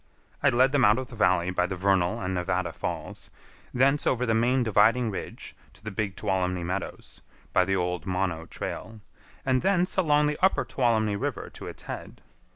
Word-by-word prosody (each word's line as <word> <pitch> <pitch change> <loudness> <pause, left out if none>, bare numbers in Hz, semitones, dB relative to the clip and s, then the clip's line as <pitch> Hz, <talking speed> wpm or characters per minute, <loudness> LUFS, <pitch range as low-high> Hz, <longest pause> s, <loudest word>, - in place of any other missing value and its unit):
I - - +5
led 130 +3 +3
them 140 -2 +2
out 105 0 +5
of 130 -1 -4
the 120 - -10
valley 90 -4 +2
by 90 -1 +1
the 95 - -4
Vernal 95 -1 +1
and 95 0 -2
Nevada 90 0 -1
Falls, - - -5 0.4
thence 135 +3 +2
over 125 0 +1
the 115 - +1
main 125 +3 +2
dividing 110 +2 +3
ridge 95 - -7 0.2
to - - -22
the 110 - -5
Big 100 -1 -3
Tuolumne 90 -2 -1
Meadows, 95 +2 -5 0.3
by 90 - +4
the 95 +1 0
old 90 -2 -2
Mono 90 -3 -2
trail, 110 +4 -6 0.4
and 130 -1 +2
thence 185 -1 +1
along 150 -5 +3
the 150 0 -1
upper 190 - +3
Tuolumne 110 -5 +1
River - - -4
to - - -9
its - - -9
head. - - -8
105 Hz, 185 wpm, -27 LUFS, 90-125 Hz, 0.4 s, I